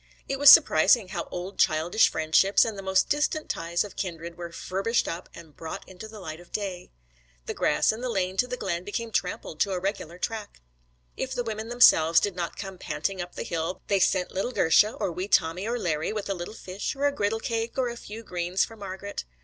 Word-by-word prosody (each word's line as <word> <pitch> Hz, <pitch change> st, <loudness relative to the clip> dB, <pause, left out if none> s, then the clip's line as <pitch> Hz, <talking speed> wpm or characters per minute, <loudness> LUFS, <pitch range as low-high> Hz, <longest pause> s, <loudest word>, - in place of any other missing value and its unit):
It 275 Hz, 0 st, -2 dB
was 285 Hz, 0 st, +9 dB
surprising 205 Hz, -, +7 dB
how 175 Hz, -3 st, -4 dB
old 180 Hz, +2 st, -6 dB
childish 165 Hz, +7 st, +3 dB
friendships 160 Hz, +6 st, +3 dB
and 225 Hz, -2 st, -3 dB
the 195 Hz, -, -6 dB
most 190 Hz, 0 st, +2 dB
distant 300 Hz, +1 st, 0 dB
ties 170 Hz, +1 st, -1 dB
of 205 Hz, -, -10 dB
kindred 170 Hz, -2 st, -5 dB
were 170 Hz, -1 st, -7 dB
furbished 195 Hz, +7 st, -1 dB
up 170 Hz, +2 st, -5 dB
and 160 Hz, -4 st, -13 dB
brought 160 Hz, -1 st, -7 dB
into 190 Hz, +4 st, -10 dB
the 215 Hz, -1 st, -11 dB
light 160 Hz, -4 st, -7 dB
of 175 Hz, -, -16 dB
day. 195 Hz, -4 st, -4 dB, 0.6 s
The -, -, -3 dB
grass -, -, +2 dB
in 220 Hz, +2 st, -7 dB
the 255 Hz, -, -2 dB
lane 190 Hz, -4 st, -1 dB
to 250 Hz, -, +2 dB
the 250 Hz, 0 st, -4 dB
glen 175 Hz, -5 st, -3 dB
became 225 Hz, +3 st, -4 dB
trampled 180 Hz, -5 st, -3 dB
to 195 Hz, +2 st, +1 dB
a 180 Hz, -, -1 dB
regular 180 Hz, -3 st, -4 dB
track. 215 Hz, -, -5 dB, 0.6 s
If 265 Hz, 0 st, -4 dB
the 245 Hz, -, -1 dB
women 220 Hz, 0 st, -5 dB
themselves 165 Hz, -9 st, +6 dB
did 200 Hz, 0 st, -2 dB
not 175 Hz, -2 st, -4 dB
come 190 Hz, -2 st, -7 dB
panting 195 Hz, -1 st, -3 dB
up 175 Hz, 0 st, -8 dB
the -, -, -4 dB
hill 165 Hz, +2 st, -3 dB
they 200 Hz, -1 st, +3 dB
sent 185 Hz, -1 st, +2 dB
the -, -, -16 dB
little 195 Hz, +6 st, -1 dB
girsha, 210 Hz, +4 st, +4 dB
or -, -, -1 dB
wee 180 Hz, +3 st, -4 dB
Tommy 180 Hz, +1 st, +1 dB
or 240 Hz, +1 st, -1 dB
Larry, 160 Hz, -8 st, -1 dB
with 210 Hz, -2 st, -3 dB
a -, -, +2 dB
little 180 Hz, +4 st, -7 dB
fish, 190 Hz, +4 st, -5 dB
or 280 Hz, +1 st, -1 dB
a 285 Hz, -, +4 dB
griddle 225 Hz, -5 st, -1 dB
cake, 230 Hz, +2 st, -3 dB
or 260 Hz, -1 st, +1 dB
a 240 Hz, -, -4 dB
few 225 Hz, -1 st, -9 dB
fresh -, -, -25 dB
greens 175 Hz, +1 st, 0 dB
for 225 Hz, -, -13 dB
Margret. 200 Hz, -1 st, -6 dB
195 Hz, 230 wpm, -26 LUFS, 175-220 Hz, 0.6 s, was